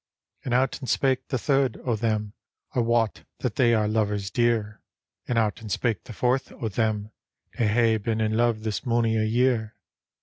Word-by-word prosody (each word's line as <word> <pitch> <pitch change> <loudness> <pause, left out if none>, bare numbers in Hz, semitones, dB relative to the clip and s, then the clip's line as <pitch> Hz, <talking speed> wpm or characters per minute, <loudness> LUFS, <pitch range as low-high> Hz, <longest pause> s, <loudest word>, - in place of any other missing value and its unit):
And 125 - -4
out 130 +2 +1
and 130 - -6
spake 135 -2 +1
the 130 - -1
third 135 -1 +1
o' 120 -3 +1
them, 105 -2 -1 0.2
" - - -44
I - - 0
wot 115 -2 +1 0.2
that 125 -4 -2
they 120 -3 +4
are 105 -1 +2
lovers 105 -2 0
dear." 115 -3 0 0.5
And 120 - 0
out 110 -1 +1
and 110 -2 -7
spake 115 0 -1
the - - -9
fourth 125 +4 0
o' 115 - -4
them, 110 0 -1 0.2
" - - -29
They 115 - +3
hae 115 +1 +3
been 110 +1 -2
in 110 0 +1
love 115 -2 +1
this 110 -2 -2
mony 115 -3 +1
a 110 -1 +1
year." 115 -1 +1
115 Hz, 200 wpm, -25 LUFS, 110-120 Hz, 0.5 s, they